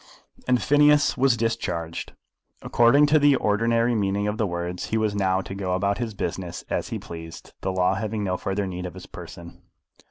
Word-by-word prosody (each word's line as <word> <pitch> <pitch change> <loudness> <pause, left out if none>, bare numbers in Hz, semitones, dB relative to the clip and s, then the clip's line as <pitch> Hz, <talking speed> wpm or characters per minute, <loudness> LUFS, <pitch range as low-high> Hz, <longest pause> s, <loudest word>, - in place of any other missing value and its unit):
And 125 -1 +3
Phineas 145 +1 +4
was 130 -2 +3
discharged. 90 -8 -3 0.5
According 120 +5 +5
to 150 +1 +4
the 145 -1 +5
ordinary 115 +2 +1
meaning 100 -1 0
of 105 +1 -3
the 110 - +1
words 85 0 -4
he 110 - -1
was 110 -2 0
now 95 -2 +1
to 95 - -8
go 95 -2 -2
about 100 +3 0
his 115 -3 -4
business 90 -2 -4
as - - -2
he - - -3
pleased, 80 -1 -10
the 95 - -1
law 95 0 +2
having 105 +1 -3
no 90 -2 -1
further 95 +2 -2
need 90 -1 -5
of 90 - -10
his - - -10
person. 85 0 -11
100 Hz, 190 wpm, -24 LUFS, 90-115 Hz, 0.5 s, According